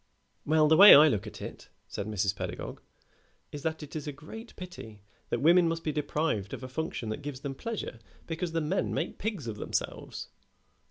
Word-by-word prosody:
"Well, 155 0 +5
the 160 - +6
way 200 +3 +12
I 150 +2 +9
look 110 -7 0
at - - -8
it," - - -9 0.2
said 100 - -5
Mrs. 100 -2 0
Pedagog, - - -6 0.7
"is 145 - -6
that 160 +1 -3
it 150 - -10
is 150 -1 -4
a - - -2
great 185 - -11
pity 115 - -10 0.3
that 120 - -1
women 170 +2 +6
must 165 0 -2
be 155 - 0
deprived 150 -8 -1
of - - -11
a - - -5
function 130 -4 -4
that 110 +7 -4
gives 140 -2 -6
them 140 -1 -4
pleasure 210 - -5 0.3
because 165 +1 -3
the 165 - +1
men 150 - -1
make - - -3
pigs 205 - -3
of 110 -2 -5
themselves." - - -4
150 Hz, 200 wpm, -29 LUFS, 120-165 Hz, 0.7 s, way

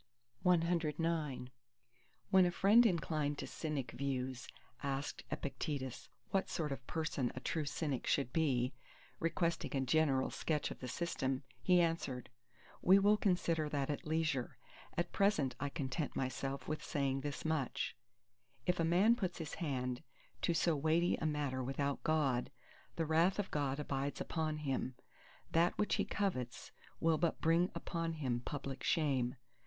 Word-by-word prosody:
CX 165 -5 +1 0.8
When 190 -1 +7
a - - +2
friend 205 +7 +6
inclined 155 -5 0
to - - -4
Cynic 145 -6 -3
views 130 -1 -3 0.3
asked 140 0 -3
Epictetus, 135 -2 -4 0.2
what 195 -1 +1
sort 155 -4 -2
of 135 -2 -5
person 155 -6 -1
a - - -3
true 155 +3 -1
Cynic 145 -2 -2
should 135 -3 +1
be, 130 -5 +2 0.5
requesting 165 -1 0
a - - +1
general 135 -1 +2
sketch 150 -2 -1
of - - -7
the 130 - -5
system, 135 -3 -1 0.2
he 180 -1 +5
answered:—"We 135 +2 0
will 205 +2 +5
consider 170 -6 +1
that 145 -1 0
at 145 - -5
leisure. 155 -5 0 0.4
At 175 0 0
present 195 -11 +2
I 145 +2 -1
content 140 0 -3
myself 135 0 -2
with 155 - -3
saying 135 -1 0
this 145 +2 -4
much: 160 -5 -1 0.7
If 180 -1 +1
a - - +3
man 185 +8 +5
put 190 -7 -2
his 160 -3 -5
hand 125 -6 -2 0.4
to 170 - +2
so 165 0 +3
weighty 160 +4 +3
a 160 - -1
matter 145 -4 -1
without 140 +2 -1
God, 140 -6 +2 0.5
the 165 - 0
wrath 165 +5 +3
of 205 -2 -2
God 140 -1 0
abides 140 -1 -2
upon 155 -2 -1
him. 130 -1 -1 0.6
That 170 +2 +3
which 210 - +2
he - - +1
covets 130 - -2 0.3
will 160 -1 +3
but 170 0 +1
bring 170 +3 +3
upon 165 -2 -2
him 130 -6 -1
public 135 +1 -5
shame. 135 -7 +1
150 Hz, 150 wpm, -36 LUFS, 135-165 Hz, 0.8 s, When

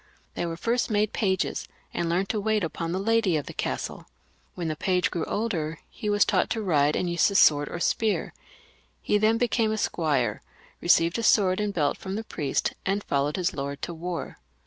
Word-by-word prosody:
They 175 - -2
were 165 0 -4
first 235 +8 0
made 210 -1 +1
pages, 190 -4 0 0.3
and 170 - -1
learned 185 +3 0
to 215 - -1
wait 215 -1 +1
upon 165 0 -3
the 180 - -1
lady 210 -3 +2
of 145 - -3
the - - -8
castle. - - -4 0.5
When 175 -3 -3
the 155 - -2
page 180 +3 +1
grew 170 - -2
older 165 -8 -2
he 210 - -4
was 205 0 +4
taught - - +1
to 225 -2 -2
ride 150 -5 +2
and 180 - 0
use 170 0 +3
the 200 - -2
sword 145 -5 +5
or 170 - -5
spear. 215 +4 0 0.7
He 210 - +1
then 220 +2 +3
became 230 -2 +1
a 220 - -1
squire, 140 - 0 0.4
received 170 +6 +3
a - - -2
sword 195 -4 +4
and 210 -1 0
belt 150 -7 0
from 190 0 -5
the 220 - -3
priest, 150 -10 -1
and 200 +2 -1
followed 140 +2 0
his 185 -1 0
lord 140 0 -4
to 175 - -3
war. 170 +1 -5
185 Hz, 205 wpm, -26 LUFS, 160-210 Hz, 0.7 s, sword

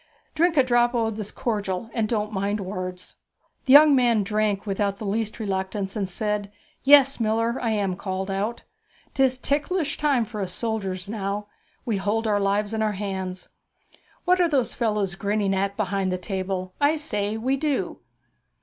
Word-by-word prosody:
Drink 330 +1 +2
a 270 - +7
drap 240 -1 +2
o' 225 -1 +1
this 210 -1 -5
cordial, 210 -1 -3
and 220 -3 0
don't 215 -2 -1
mind 200 +2 -1
words.' 185 -2 -6 0.5
The 260 - +5
young 295 +1 +9
man 240 -5 +3
drank 210 0 0
without 200 0 -1
the 215 - -6
least 215 +3 -2
reluctance, 195 -1 -3
and 200 -3 -2
said, 210 +1 -2 0.3
'Yes, 275 -1 +6
miller, 230 +2 +1
I 230 - 0
am 200 -4 0
called 190 0 -4
out. 205 +5 -2 0.5
'Tis 265 -1 +2
ticklish 295 +4 -1
times 275 -7 +2
for 210 -3 -4
us 185 -2 -3
soldiers 195 -4 -3
now; 205 -1 -3 0.4
we 225 -4 0
hold 210 +4 -1
our 210 -2 +2
lives 205 +2 0
in 220 - -1
our 215 -1 +1
hands 190 -2 -5 0.8
What 365 0 +4
are 345 - +3
those 270 -5 +1
fellows 210 -5 0
grinning 200 +1 0
at 195 +1 -1
behind 195 -2 0
the 185 - 0
table? 185 0 -4
I 290 +2 +4
say, 215 -9 -2
we 255 +4 0
do!' 290 0 -1
210 Hz, 170 wpm, -25 LUFS, 195-240 Hz, 0.8 s, young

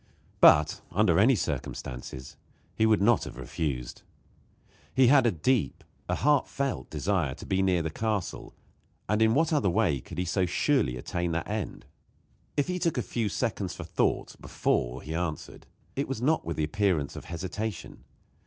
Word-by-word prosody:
But, 75 +1 +6
under - - +3
any - - +5
circumstances, 65 +1 -5 0.4
he 110 - +2
would 110 -3 +3
not 120 +2 +4
have - - -9
refused. 65 0 -4 0.9
He 130 0 +6
had 130 -1 +6
a - - +3
deep 90 - 0 0.3
a - - +1
heartfelt 140 -2 0
desire 80 -3 -1
to - - -10
be 95 0 +1
near 90 -3 +2
the 80 - -3
castle; 105 0 -3 0.5
and 105 +2 +1
in 110 +1 +4
what 160 +2 +2
other 140 -10 +2
way 90 -7 +2
could - - -10
he 90 - 0
so 90 +1 +1
surely 90 - +1
attain 85 +6 -2
that 85 0 -2
end? 105 -2 -4 0.7
If 145 - +2
he 180 0 -2
took 170 -5 0
a 125 - 0
few 115 -3 -2
seconds 100 -5 -2
for - - -7
thought - - -1
before 60 +2 -1
he 80 - -5
answered, 80 -2 -4 0.3
it 140 - -1
was 135 -4 -3
not 150 +6 +2
with 85 - -4
the 80 - 0
appearance 85 -4 0
of - - -8
hesitation. 95 +4 -5
95 Hz, 170 wpm, -28 LUFS, 80-120 Hz, 0.9 s, But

